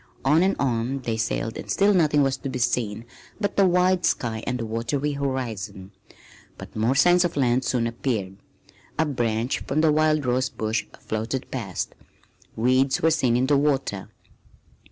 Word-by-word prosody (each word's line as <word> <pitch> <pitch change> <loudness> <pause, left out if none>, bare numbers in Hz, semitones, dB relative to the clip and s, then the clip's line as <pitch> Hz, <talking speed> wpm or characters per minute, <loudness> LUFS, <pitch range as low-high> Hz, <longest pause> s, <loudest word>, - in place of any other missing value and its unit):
On 150 +5 +4
and 190 +2 +2
on 130 +1 -1
they 115 -2 -2
sailed 115 0 -2
and - - -8
still 200 +1 +3
nothing 150 -5 +3
was 135 -1 +1
to 135 - -5
be 130 - -4
seen 115 -3 -1 0.3
but 205 -2 -2
the 195 -1 +5
wide 180 0 +2
sky 110 -2 -1
and 125 - -1
the 115 - -4
watery 120 +6 -2
horizon. 115 -9 -4 0.7
But - - -11
more 115 +5 +1
signs 175 +4 +5
of 175 -4 -2
land 125 -1 +2
soon 120 -2 0
appeared. 115 -5 -3 0.6
A 160 - +2
branch 120 -3 -1
from 155 +3 -1
a 160 - +5
wild 155 -1 +2
rose 130 +1 +1
bush 110 0 -2
floated 110 +4 -4
past. 105 -9 -4 0.6
Weeds 130 +4 +2
were 160 - +5
seen 125 -7 +2
in 125 - +2
the 145 +1 +3
water. 135 -9 -1
130 Hz, 170 wpm, -24 LUFS, 115-150 Hz, 0.7 s, the